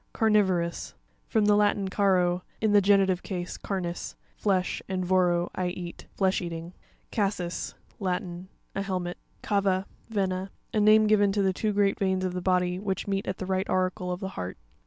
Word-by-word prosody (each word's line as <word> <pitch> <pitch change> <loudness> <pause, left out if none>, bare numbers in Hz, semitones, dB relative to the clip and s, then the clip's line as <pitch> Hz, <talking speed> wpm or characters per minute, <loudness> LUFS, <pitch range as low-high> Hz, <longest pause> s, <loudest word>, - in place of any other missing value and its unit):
Carn' 220 -1 +2
vorous.—From 190 +2 0
the 210 0 +5
Latin, 205 -1 +2
caro, 185 -2 +2 0.2
in 215 -1 +2
the 205 0 +6
genitive 190 -2 +4
case, 180 -2 -4
carnis, 180 -3 -4 0.2
flesh, 190 -3 0
and 185 -1 -1
voro, 175 -1 +2
leat. 180 -1 -4
Flesh 190 -1 +2
eating. 170 0 -5 0.4
Cas'sis.—Latin. 185 -2 -3 0.3
A 195 - -2
helmet 185 -3 -3 0.2
(page - - -10
54). - - +4
Ca'va 190 -1 +1 0.2
(Vena).—A 195 0 -2
name 215 +1 +6
given 205 -1 +4
to 200 -1 +1
the 190 -1 +2
two 215 +3 0
great 200 0 +2
veins 190 -2 +1
of 185 - -2
the 180 - -3
body, 180 -1 +1
which 195 -1 -2
meet 195 -1 -1
at 185 - -2
the 185 - -4
right 190 +1 -1
auricle 185 -1 0
of 180 - -4
the 190 - -3
heart. 90 - -5
190 Hz, 170 wpm, -27 LUFS, 180-200 Hz, 0.4 s, the